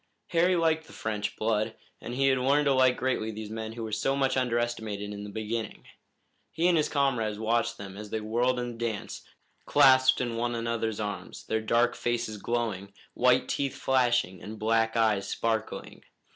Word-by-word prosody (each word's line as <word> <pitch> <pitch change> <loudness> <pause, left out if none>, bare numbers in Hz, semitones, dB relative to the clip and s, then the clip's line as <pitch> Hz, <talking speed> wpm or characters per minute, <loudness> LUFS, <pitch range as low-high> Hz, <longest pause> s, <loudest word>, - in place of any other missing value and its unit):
Harry 180 +2 +3
liked 160 -2 +1
the - - -14
French 105 -1 -3
blood, 110 0 0 0.3
and 120 - -6
he 135 +1 +2
had 130 -1 +2
learned 140 +3 +3
to 140 - +4
like 130 -1 +4
greatly 125 -4 -1
these 110 -1 -6
men 110 0 -5
who 115 0 -6
were 110 - -5
so 135 +5 0
much 135 -1 +1
underestimated 115 -5 -1
in 100 0 -7
the 105 - -7
beginning. 110 +2 -4 0.7
He 165 +3 +1
and 180 - +4
his 155 -2 +2
comrades 125 -7 0
watched 115 +2 0
them 100 -1 -8
as 105 +1 -8
they 110 - -2
whirled 120 +4 0
in 120 0 -3
the 115 - -10
dance, 115 -3 -4 0.5
clasped 130 0 +6
in 120 -2 -2
one 120 +1 -1
another's 115 -2 -2
arms, 105 -1 -5
their 110 - -1
dark 120 +2 +2
faces 120 -2 -2
glowing, 105 -3 -2 0.2
white 125 +1 +3
teeth 140 -1 -1
flashing 120 -8 +1
and 110 +1 -8
black 115 +1 +1
eyes 110 -3 +2
sparkling. 110 -1 -3
115 Hz, 185 wpm, -28 LUFS, 110-130 Hz, 0.7 s, clasped